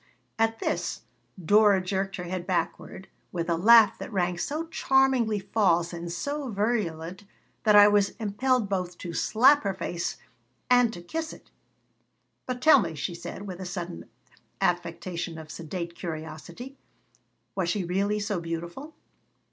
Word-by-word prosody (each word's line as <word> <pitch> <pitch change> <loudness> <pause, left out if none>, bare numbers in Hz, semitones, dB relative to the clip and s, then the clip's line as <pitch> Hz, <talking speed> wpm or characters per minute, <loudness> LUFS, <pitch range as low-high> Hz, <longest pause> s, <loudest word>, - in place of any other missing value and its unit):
At 225 0 +2
this 175 - -2 0.4
Dora 205 +2 +5
jerked 190 +1 -2
her 180 - -5
head 180 0 -5
backward, 180 +1 -3 0.2
with 170 -2 -3
a - - +3
laugh 220 +5 +6
that - - -7
rang 180 -3 0
so 310 +3 -2
charmingly 265 -8 +2
false 180 -4 +1
and 170 0 -5
so 285 - -3
virulent 200 -5 -2 0.4
that 210 -1 +6
I 205 0 +9
was 205 -1 +2
impelled 225 +2 +1
both 180 -2 -3
to 175 -2 -7
slap 260 - +4
her 195 -2 -2
face 175 -2 -3 0.5
and 245 -2 +5
to 175 -5 -9
kiss 320 - -4
it - - -16 1.0
"But 250 0 -4
tell 310 -5 +7
me," 165 -4 -4
she 145 +4 -3
said, 175 +3 -7
with 185 -2 -7
a - - -5
sudden 175 -1 -6 0.5
affectation 175 -3 -2
of 155 -1 -9
sedate 170 +1 -5
curiosity, 170 - -7 0.8
"was 185 -3 -1
she 195 +2 0
really 200 +4 0
so 205 -2 -2
beautiful?" 170 - -6
190 Hz, 150 wpm, -27 LUFS, 170-225 Hz, 1.0 s, I